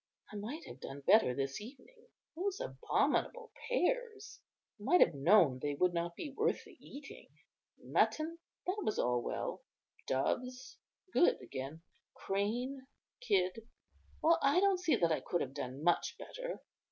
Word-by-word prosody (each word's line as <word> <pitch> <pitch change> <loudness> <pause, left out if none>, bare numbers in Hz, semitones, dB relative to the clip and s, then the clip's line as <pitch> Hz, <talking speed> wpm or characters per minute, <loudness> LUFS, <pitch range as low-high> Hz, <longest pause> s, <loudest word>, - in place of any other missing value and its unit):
I - - -7
might 240 +11 -5
have - - -10
done 140 +1 -7
better 170 - +5
this 135 +5 -2
evening. 285 - -13 0.3
Those 385 +3 -2
abominable 485 -1 0 0.2
pears! 460 -1 -1 0.4
I - - -12
might 355 +8 +5
have - - +6
known 145 -2 +5
they 145 -1 -1
would 180 +4 +2
not 170 0 -2
be 295 - -5
worth - - +1
the - - -15
eating. 280 0 -11 0.5
Mutton, 325 +2 0 0.3
that 385 +3 -1
was 215 - -1
all 125 0 +1
well; - - -3 0.5
doves, 250 - -2 0.3
good 350 - +4
again; 140 +4 -7 0.3
crane, 245 +7 -2 0.3
kid; 215 - 0 0.6
well, 330 +1 +5
I 280 +6 +4
don't 390 -1 +3
see 350 -4 +3
that 170 -1 +2
I 160 - +2
could 175 - -1
have 135 - -3
done 135 0 -5
much 175 +1 +2
better." - - -6
235 Hz, 150 wpm, -34 LUFS, -, 0.6 s, have